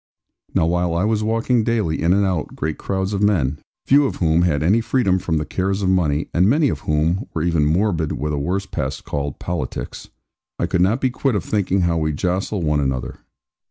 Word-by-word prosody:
Now - - +3
while 85 0 0
I 85 - +1
was 110 0 +1
walking 115 +2 +1
daily 105 -9 0
in 85 - +2
and 100 +2 +3
out 90 -5 -2
great 80 +1 -3
crowds 95 +1 -2
of 100 - -1
men 75 -9 +1 0.3
(few 140 +1 +5
of - - -4
whom 80 -1 +2
had 80 -4 +1
any 100 +8 +3
freedom 100 -6 +1
from 80 -3 -1
the 75 - -2
cares 95 +5 -1
of 95 - +2
money, 80 -5 +1
and 90 +4 +3
many 145 +3 +3
of - - -3
whom 80 - +1
were 80 - 0
even 85 -4 +2
morbid 85 -1 +1
with 75 +1 -3
a 75 - -1
worse 95 +7 -1
pest - - -4
called 70 -1 -3
'politics'), - - -5 0.5
I - - 0
could 90 0 0
not 105 +8 +2
be 130 - +1
quit 130 -1 0
of 95 - -2
thinking 100 -2 0
how 85 -1 +1
we 75 -1 0
jostle 90 +4 -1
one 75 -1 +1
another. 65 -3 -2
90 Hz, 215 wpm, -21 LUFS, 80-105 Hz, 0.5 s, few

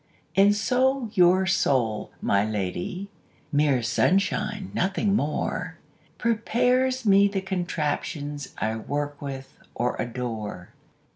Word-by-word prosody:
And 200 +2 +5
so 255 +2 +1
your 185 0 +5
soul, 125 - +1
my 100 0 +3
lady 105 - -3 0.4
(Mere 145 -4 +2
sunshine, 195 - +1
nothing 195 +2 +1
more) 150 -5 -2 0.4
Prepares 250 +3 +1
me 200 0 +6
the 200 -1 -2
contraptions 150 -6 -3
I 110 +1 -1
work 145 +5 -4
with 135 -2 -7 0.2
or 125 +1 0
adore. 115 -7 -5
175 Hz, 100 wpm, -25 LUFS, 130-205 Hz, 0.4 s, me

